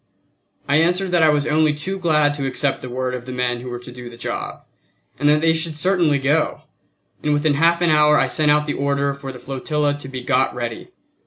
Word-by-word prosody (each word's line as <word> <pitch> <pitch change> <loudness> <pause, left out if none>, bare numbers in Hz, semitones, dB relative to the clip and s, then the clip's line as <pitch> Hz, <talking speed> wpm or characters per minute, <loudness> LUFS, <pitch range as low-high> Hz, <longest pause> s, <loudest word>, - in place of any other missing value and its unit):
I 140 +1 +3
answered 180 +3 +1
that 175 -1 +3
I 160 - +5
was 150 -1 +1
only 155 -1 +2
too 190 +6 -5
glad 150 -4 +2
to 140 -2 -3
accept 135 +1 -1
the 130 - -7
word 130 +1 -3
of 125 -1 -6
the 130 - -7
men 125 -1 -1
who 125 +1 -8
were 120 - -5
to 125 +1 -11
do 125 0 -9
the 120 - -13
job, 120 - -5 0.6
and 145 +1 +3
that 150 0 +3
they 165 0 +3
should 160 -1 -2
certainly 170 -3 +2
go; 145 +3 0 0.6
and 150 - 0
within 145 +1 +2
half 170 +4 +2
an 170 - +3
hour 150 0 +5
I - - +3
sent 155 -1 +1
out 150 0 +3
the 145 - -2
order 140 0 0
for 135 -1 -8
the 130 - -10
flotilla 140 +3 -2
to 130 - -8
be 130 -2 -7
got 130 0 +1
ready. 120 -2 -5
145 Hz, 235 wpm, -20 LUFS, 130-155 Hz, 0.6 s, I